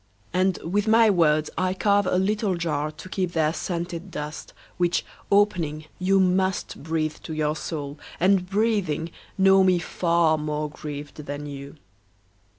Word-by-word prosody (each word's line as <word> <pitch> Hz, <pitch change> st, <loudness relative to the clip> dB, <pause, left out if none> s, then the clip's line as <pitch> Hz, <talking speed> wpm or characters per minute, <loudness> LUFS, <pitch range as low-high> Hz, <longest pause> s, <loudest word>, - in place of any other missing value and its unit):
And 185 Hz, +1 st, +2 dB
with 205 Hz, +5 st, 0 dB
my 225 Hz, 0 st, +6 dB
words 155 Hz, -4 st, +2 dB
I 185 Hz, 0 st, 0 dB
carve 200 Hz, 0 st, +2 dB
a 180 Hz, -, +2 dB
little 205 Hz, +1 st, +1 dB
jar 155 Hz, -3 st, -1 dB
To 155 Hz, +4 st, -11 dB
keep 185 Hz, -2 st, -2 dB
their 160 Hz, -1 st, +2 dB
scented 175 Hz, +1 st, -4 dB
dust, 150 Hz, -2 st, -6 dB, 0.3 s
Which, 175 Hz, -1 st, +1 dB, 0.3 s
opening, 170 Hz, -7 st, +2 dB
you 195 Hz, +1 st, +3 dB
must 190 Hz, 0 st, +1 dB
Breathe 155 Hz, 0 st, -2 dB
to 160 Hz, -, -6 dB
your 155 Hz, 0 st, 0 dB
soul, 145 Hz, -3 st, -5 dB, 0.2 s
and, 185 Hz, 0 st, +3 dB
breathing, 195 Hz, -7 st, 0 dB, 0.3 s
know 195 Hz, 0 st, +6 dB
me 185 Hz, -1 st, +4 dB
far 170 Hz, -2 st, +1 dB
More 150 Hz, 0 st, -2 dB
grieved 145 Hz, -1 st, -7 dB
than 145 Hz, +1 st, -5 dB
you. 140 Hz, 0 st, -8 dB
170 Hz, 150 wpm, -25 LUFS, 155-190 Hz, 0.3 s, my